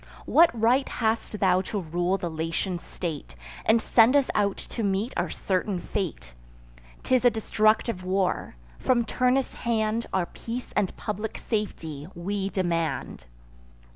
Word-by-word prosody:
What 335 +1 +6
right 250 +5 +3
hast 220 -2 -1
thou 185 -1 +4
to 200 +2 -3
rule 175 +2 0
the 175 - -3
Latian 165 +3 -2
state, 155 - -6 0.3
And 230 - +5
send 230 +3 +5
us 280 -2 +3
out 200 -2 +1
to 235 - -6
meet 200 +3 0
our - - 0
certain 190 0 -1
fate? 170 - -4 0.7
'Tis 255 -1 +2
a 245 - +7
destructive 215 -2 +1
war: 185 - 0 0.2
from 240 -2 +2
Turnus' 255 +3 +1
hand 225 -1 0
Our 190 -2 +1
peace 235 +7 -6
and 195 - -1
public 210 +1 -4
safety 165 - -3
we 195 +3 -2
demand. 170 - -2
200 Hz, 140 wpm, -26 LUFS, 180-230 Hz, 0.7 s, a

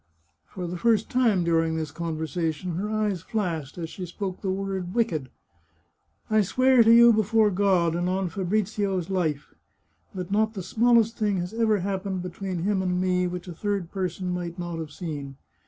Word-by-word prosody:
For 180 - -6
the 175 0 -5
first 225 -1 +2
time 230 -8 +3
during 165 -1 +1
this 160 -2 -3
conversation, 165 +1 -3
her 205 +3 -2
eyes 210 -4 -1
flashed 175 - -3
as 165 -2 -5
she 180 -2 -6
spoke 185 +1 -5
the 195 - -2
word 190 -1 -3
wicked. 160 - 0 0.5
" 85 0 -45
I 215 0 +5
swear 255 +5 +4
to 225 - +5
you, 235 0 +8
before 220 0 +3
God, 185 -4 +2
and 175 +1 0
on 190 0 0
Fabrizio's 195 0 -1
life, 155 -6 -1 0.6
that 185 0 -5
not 220 +2 +1
the 190 - -4
smallest 230 +3 +3
thing 205 -3 +1
has 180 +3 -4
ever 220 -3 +2
happened 190 -1 -3
between 180 -1 -4
him 200 -1 +1
and 180 -1 0
me, 180 -1 +1
which 180 +1 -6
a 175 - -6
third 195 -1 -2
person 185 -1 -3
might 175 -1 -4
not 175 -2 -4
have 160 -2 -5
seen. 145 -4 -6
185 Hz, 180 wpm, -26 LUFS, 170-210 Hz, 0.6 s, you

